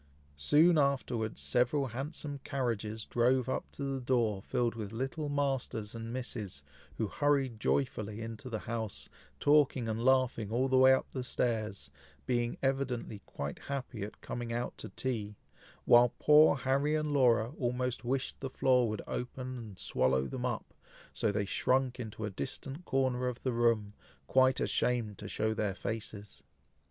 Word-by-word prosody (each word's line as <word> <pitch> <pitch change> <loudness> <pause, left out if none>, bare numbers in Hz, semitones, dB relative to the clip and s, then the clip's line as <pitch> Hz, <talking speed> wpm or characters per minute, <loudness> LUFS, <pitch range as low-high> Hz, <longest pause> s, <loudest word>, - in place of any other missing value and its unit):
Soon 155 - +5
afterwards, 125 -6 0
several 130 +2 +2
handsome 145 +3 -5
carriages 110 -5 -2
drove 125 +1 +2
up 130 - -3
to 140 - -6
the 135 -1 -2
door 120 -6 +1
filled 120 +3 0
with 110 -3 -6
little 135 +6 -3
Masters 135 -7 -1
and 115 0 -6
Misses, 105 - -5 0.3
who 110 - 0
hurried 135 -1 +1
joyfully 110 -5 -1
into 115 +2 -6
the 110 -3 -3
house, 110 -3 -4 0.3
talking 145 -5 +4
and 110 +1 -2
laughing 130 -5 +2
all 125 +3 +2
the 130 0 +3
way 130 0 +8
up 130 - +3 0.2
stairs, 110 - -2 0.3
being 120 -1 0
evidently 130 -6 -1
quite 70 0 -5
happy 130 -5 -5
at 105 +2 -6
coming 120 -1 -5
out 120 +1 -2
to - - -6
tea, 110 -5 -3 0.5
while 120 0 +7
poor 150 +1 +6
Harry 140 +3 +1
and 155 -1 -1
Laura 120 -4 +4
almost 125 -1 -1
wished 130 +2 -2
the 135 - -4
floor 125 -2 +3
would 110 - -4
open 130 +1 -4
and 105 -5 -9
swallow 65 -2 +1
them 125 - -3
up, 120 -3 -4 0.4
so 110 - +1
they 100 0 -1
shrunk 130 +5 +1
into 110 -2 -5
a 105 - -4
distant 135 - -5
corner 130 -2 +1
of 125 -1 -4
the 130 - 0
room, 115 -3 +2 0.3
quite 130 - +4
ashamed 115 -5 0
to - - -6
show 110 0 0
their 105 -3 -1
faces. 105 -2 -6
120 Hz, 155 wpm, -32 LUFS, 110-135 Hz, 0.5 s, way